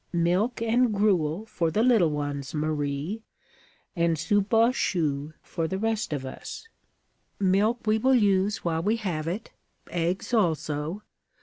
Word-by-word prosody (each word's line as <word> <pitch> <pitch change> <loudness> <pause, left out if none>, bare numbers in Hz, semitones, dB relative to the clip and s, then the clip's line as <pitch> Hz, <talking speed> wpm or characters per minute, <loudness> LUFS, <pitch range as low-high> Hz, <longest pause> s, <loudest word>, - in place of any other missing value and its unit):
Milk 180 +8 +1
and 235 +1 +3
gruel 200 -3 +1
for 170 -7 -1
the 210 +8 +1
little 225 -9 +4
ones, 145 -1 -4
Marie, 150 +5 -2 0.7
and 170 -2 +2
soupe 200 +6 +1
aux 230 +1 +5
choux 155 - -1
for 165 -2 -3
the 190 - -2
rest 225 0 -1
of 140 -3 -3
us. 130 - -8 0.7
Milk 205 +5 +2
we 215 0 +2
will 260 +3 +4
use 200 -3 +2
while 165 -1 0
we 210 +6 +1
have 175 -8 -3
it. 195 +6 -4 0.4
Eggs 175 +6 -2
also. 160 -2 0
185 Hz, 140 wpm, -26 LUFS, 155-215 Hz, 0.7 s, aux